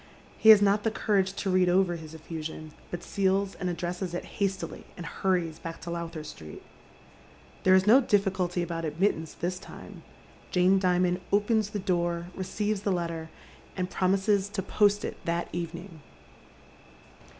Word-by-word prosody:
He 220 - +6
haa 220 - +12
not 200 +1 +3
the 225 - +1
courage 195 -3 +1
to 195 -1 -2
read 185 -1 +4
over 180 -1 +3
his 160 -1 -9
effusion, 160 -1 -7 0.2
but 175 - -5
seals 195 0 +1
and 180 - -3
addresses 175 +1 -3
it - - -4 0.2
hastily, 195 -1 -2
and 175 - -6
hurries 170 -3 -1
back 165 0 -7
to 170 - -6
Lowther 170 -2 -5
Street. 80 - -10 1.0
There 185 0 +5
is 190 0 +4
no 240 +6 +7
diffi 205 -5 +2
culty 180 -1 -1
about 165 -1 -4
admittance 160 0 -1
tliis 180 +2 -2
time. - - -11 0.5
Jane 185 +1 +4
Dimond 180 -1 +2
opens 210 +1 +2
the 210 - -4
door, 175 -2 -1
receives 205 +2 -2
the 200 - 0
letter, 170 -2 -3 0.5
and 180 0 -2
promises 195 +1 +2
to 200 -2 -3
post 205 +1 +2
it - - -7
that 170 0 -1
evening. 170 0 -6
180 Hz, 160 wpm, -28 LUFS, 170-195 Hz, 1.0 s, haa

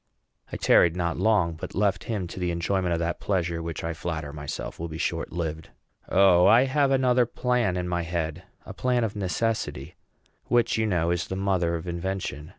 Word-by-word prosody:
I - - -4
tarried 85 -1 +4
not 85 -2 -1
long, 105 -7 +2
but 80 - -8
left 100 0 +1
him 105 -5 -2
to - - -7
the 90 -1 -1
enjoyment 90 +2 0
of 85 - +1
that 85 +1 -2
pleasure 85 -4 -1
which 85 -1 -5
I 85 0 -2
flatter 80 -3 -5
myself 75 -1 -6
will 85 - -3
be 80 - -8
but - - -3
shortlived. 80 -2 -3 0.4
O, 90 -2 +5
I 120 +3 +7
have 140 +1 +2
another 125 -2 +3
plan 120 -7 0
in 90 0 -2
my 85 -1 -1
head 80 -1 -3 0.2
a - - -8
plan 125 -1 +1
of 105 -2 -2
necessity, 105 +3 -2 0.5
which, 120 -1 +2
you 110 0 +1
know, 85 -4 +1
is 85 0 -1
the 95 - -4
mother 95 -3 0
of 85 +2 -6
invention. 85 -4 -4
90 Hz, 195 wpm, -26 LUFS, 85-105 Hz, 0.5 s, I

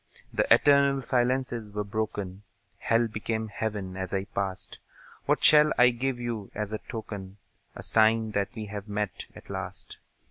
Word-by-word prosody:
The - - 0
eternal 140 -1 +5
silences 125 -3 0
were 105 0 -2
broken; 100 -2 -4 0.4
Hell 115 +1 +2
became 110 +1 -3
Heaven 105 -3 -4
as 95 0 -3
I 95 - 0
passed. 100 -2 -4 0.5
What - - +2
shall 150 0 +7
I 125 0 +7
give 125 +1 -2
you 115 -4 -4
as 105 0 -3
a 110 - -2
token, 100 -4 -7 0.4
A - - -8
sign 110 0 +3
that 100 +3 -2
we 110 -2 -5
have 105 0 -7
met, 105 -1 -3
at - - -11
last? - - -6
110 Hz, 155 wpm, -28 LUFS, 100-120 Hz, 0.5 s, shall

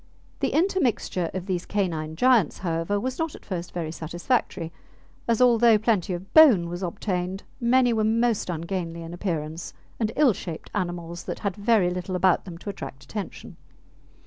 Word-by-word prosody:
The - - +1
intermixture 300 - +1
of 185 -1 -5
these 185 -3 -2
canine 160 -6 -1
giants, 240 - +3
however, 165 +4 0
was 255 +6 -3
not 325 -2 -2
at - - -14
first 175 -3 -4
very 165 -3 -3
satisfactory, 170 +2 -2 0.6
as 235 +1 +3
although 235 -2 +6
plenty 210 -4 +1
of 185 +3 -10
bone 240 - +7
was 175 +1 -5
obtained, 180 +1 -3 0.2
many 245 0 +4
were 220 -1 +1
most 225 -1 +1
ungainly 170 0 -3
in 165 +1 -8
appearance 165 -3 -4 0.2
and 220 -2 0
ill 285 -6 +5
shaped 170 -3 -7
animals 175 -3 -4
that - - -4
had 200 -3 -1
very 205 -4 +3
little 180 +1 -3
about 180 0 +3
them 175 -3 -8
to 195 - -7
attract 135 -8 -8
attention. 205 +6 -7
185 Hz, 165 wpm, -25 LUFS, 170-230 Hz, 0.6 s, bone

